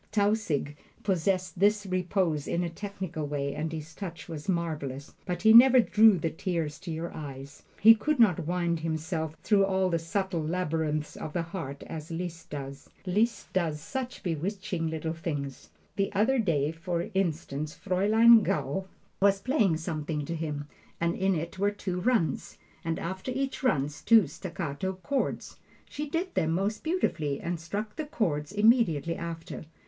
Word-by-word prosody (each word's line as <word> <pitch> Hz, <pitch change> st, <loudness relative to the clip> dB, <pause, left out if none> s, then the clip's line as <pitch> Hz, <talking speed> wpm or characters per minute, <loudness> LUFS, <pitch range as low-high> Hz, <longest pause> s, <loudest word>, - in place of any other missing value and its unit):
Tausig 200 Hz, -9 st, 0 dB, 0.3 s
possessed 185 Hz, -2 st, 0 dB
this 205 Hz, +1 st, +3 dB
repose 180 Hz, -4 st, 0 dB
in 175 Hz, -, 0 dB
a 170 Hz, -, -3 dB
technical 185 Hz, -5 st, -5 dB
way, 140 Hz, -1 st, -2 dB
and 155 Hz, +2 st, -3 dB
his 160 Hz, 0 st, -6 dB
touch 175 Hz, -2 st, -7 dB
was 160 Hz, +2 st, -6 dB
marvelous; 155 Hz, -6 st, -2 dB
but 180 Hz, +1 st, -3 dB
he 220 Hz, 0 st, +7 dB
never 255 Hz, +2 st, +9 dB
drew 220 Hz, -3 st, +6 dB
the 165 Hz, -1 st, -1 dB
tears 165 Hz, -3 st, -3 dB
to 180 Hz, 0 st, -9 dB
your 165 Hz, +2 st, -4 dB
eyes. 140 Hz, -1 st, -8 dB, 0.2 s
He 225 Hz, +2 st, +10 dB
could 285 Hz, +6 st, -1 dB
not 180 Hz, -8 st, +4 dB
wind 175 Hz, -1 st, 0 dB
himself 160 Hz, 0 st, -3 dB
through 205 Hz, -2 st, +4 dB
all 190 Hz, -1 st, +1 dB
the 170 Hz, -, +1 dB
subtle 185 Hz, 0 st, -2 dB
labyrinths 155 Hz, -2 st, -1 dB
of 150 Hz, -, -6 dB
the 170 Hz, -, 0 dB
heart 165 Hz, -5 st, -6 dB
as 155 Hz, 0 st, -7 dB
Liszt 165 Hz, 0 st, -5 dB
does. 140 Hz, -1 st, -7 dB, 0.2 s
Liszt 215 Hz, +6 st, 0 dB
does 165 Hz, -5 st, 0 dB
such 250 Hz, -, -5 dB
bewitching 180 Hz, +1 st, -2 dB
little 160 Hz, 0 st, -3 dB
things! 145 Hz, -, -5 dB, 0.3 s
The 195 Hz, -, +1 dB
other 230 Hz, +7 st, +3 dB
day, 155 Hz, -8 st, +1 dB
for 170 Hz, +1 st, -3 dB
instance, 155 Hz, -5 st, -2 dB
Fraulein 215 Hz, +5 st, +5 dB
Gaul 190 Hz, -1 st, -1 dB, 0.3 s
was 195 Hz, 0 st, +4 dB
playing 215 Hz, -, +2 dB
something 155 Hz, -2 st, -3 dB
to 165 Hz, -, -3 dB
him, 150 Hz, -3 st, -4 dB, 0.3 s
and 170 Hz, 0 st, +1 dB
in 190 Hz, 0 st, +1 dB
it 170 Hz, +3 st, -4 dB
were 200 Hz, +1 st, +3 dB
two 195 Hz, -3 st, -4 dB
runs, 220 Hz, -4 st, 0 dB, 0.3 s
and 165 Hz, -1 st, -1 dB
after 190 Hz, +7 st, -4 dB
each 270 Hz, +1 st, -2 dB
run 145 Hz, -, +2 dB
two 205 Hz, +8 st, +4 dB
staccato 170 Hz, +2 st, -4 dB
chords. 260 Hz, +9 st, -3 dB, 0.3 s
She 300 Hz, 0 st, -5 dB
did 350 Hz, +4 st, -2 dB
them 160 Hz, 0 st, +1 dB
most 200 Hz, +5 st, -1 dB
beautifully 160 Hz, -, 0 dB
and 170 Hz, 0 st, -3 dB
struck 205 Hz, -, -5 dB
the 310 Hz, -, -2 dB
chords 155 Hz, -, -1 dB
immediately 205 Hz, -, +3 dB
after. 165 Hz, -1 st, -6 dB
175 Hz, 160 wpm, -29 LUFS, 155-200 Hz, 0.3 s, He